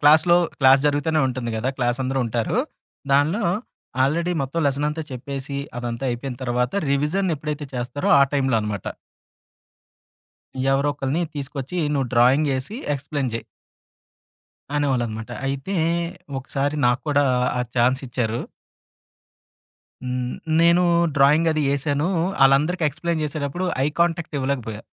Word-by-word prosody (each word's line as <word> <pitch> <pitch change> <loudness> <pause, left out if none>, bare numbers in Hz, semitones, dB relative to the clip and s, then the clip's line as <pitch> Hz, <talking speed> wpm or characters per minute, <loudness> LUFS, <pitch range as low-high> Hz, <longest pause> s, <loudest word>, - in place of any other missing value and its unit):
క్లాస్‌లో, 155 +4 +6 0.2
క్లాస్ 135 0 +7
జరుగుతూనే 145 +2 +1
ఉంటుంది 125 -2 -3
కదా! 115 +4 -1
క్లాసందరూ 130 +1 0
ఉంటారు. 115 - -1 0.5
దానిలో 155 +10 +3 0.6
ఆల్రెడీ 170 +6 +1
మొత్తం 135 +5 -2
లెసన్ 140 +1 0
అంతా 155 +2 -3
చెప్పేసి 140 +2 -5 0.2
అదంతా 120 +1 -4
అయిపోయిన 120 +1 -4
తర్వాత, 125 0 0 0.2
రివిజన్ 160 +7 +1
ఎప్పుడైతే 150 0 -4
చేస్తారో 125 +3 -2
ఆ - - +8
టైంలో 135 -4 +2
అనమాట. 105 -2 -4 1.9
ఎవరో 140 +2 +2
ఒకళ్ళని 145 +4 -1
తీసుకొచ్చి 140 +3 -5 0.2
నువ్వు 135 -3 0
డ్రాయింగ్ 130 +5 +4
ఏసి 130 - -5 0.2
ఎక్స్‌ప్లెయిన్ 140 -2 -3
చేయి. 115 - -4 1.3
అనేవాళ్ళనమాట. 120 -6 -1 0.2
అయితే 135 +8 -3 0.6
ఒకసారి 140 +2 -2
నాకు 120 +1 +2
కూడా 145 0 +3 0.3
ఆ - - +1 0.2
ఛాన్స్ 125 +2 +3
ఇచ్చారు. 120 -2 -1 1.6
హ్మ్. 125 -1 -3 0.3
నేను 170 +1 +5 0.3
డ్రాయింగ్ 150 +4 +5
అది 155 -1 0
ఎసాను. 145 +3 0 0.4
ఆళ్ళందరికీ 150 +6 +3
ఎక్స్‌ప్లెయిన్ 165 +3 -2
చేసేటప్పుడు 150 +3 -3 0.2
ఐ - - +2
కాంటాక్ట్ 170 -2 0
ఇవ్వలేకపోయా. 125 -6 -3
140 Hz, 120 wpm, -23 LUFS, 125-150 Hz, 1.9 s, ఆ